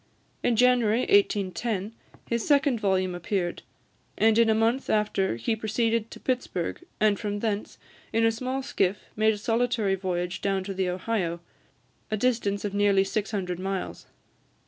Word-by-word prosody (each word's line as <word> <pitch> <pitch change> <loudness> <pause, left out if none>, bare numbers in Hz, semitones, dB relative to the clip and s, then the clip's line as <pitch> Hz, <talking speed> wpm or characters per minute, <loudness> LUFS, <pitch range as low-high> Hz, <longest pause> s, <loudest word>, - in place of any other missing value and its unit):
In 240 - +2
January 245 -1 +4
1810, 215 - +1 0.3
his 235 -1 -1
second 280 -4 +3
volume 190 -3 +1
appeared, 175 0 -2 0.6
and 220 +1 +4
in 230 -1 +5
a 220 - +4
month 230 +4 +1
after 210 - +1
he 120 - -1
proceeded 225 +1 0
to - - -10
Pittsburg, 250 - -2 0.2
and 210 -2 +3
from 205 -2 -2
thence, 210 -1 -3 0.3
in 225 +1 +2
a 225 - +4
small 255 +4 -3
skiff, 195 -5 0
made 220 0 +3
a - - -7
solitary 225 -2 +1
voyage 180 -2 -2
down 195 -1 0
the 190 -1 -2
Ohio, 180 -2 -2 0.7
a 215 - -1
distance 210 -4 0
of 200 - -3
nearly 200 -1 +3
six 205 +1 -2
hundred 180 -4 -3
miles. 190 0 -4
210 Hz, 150 wpm, -27 LUFS, 195-230 Hz, 0.7 s, in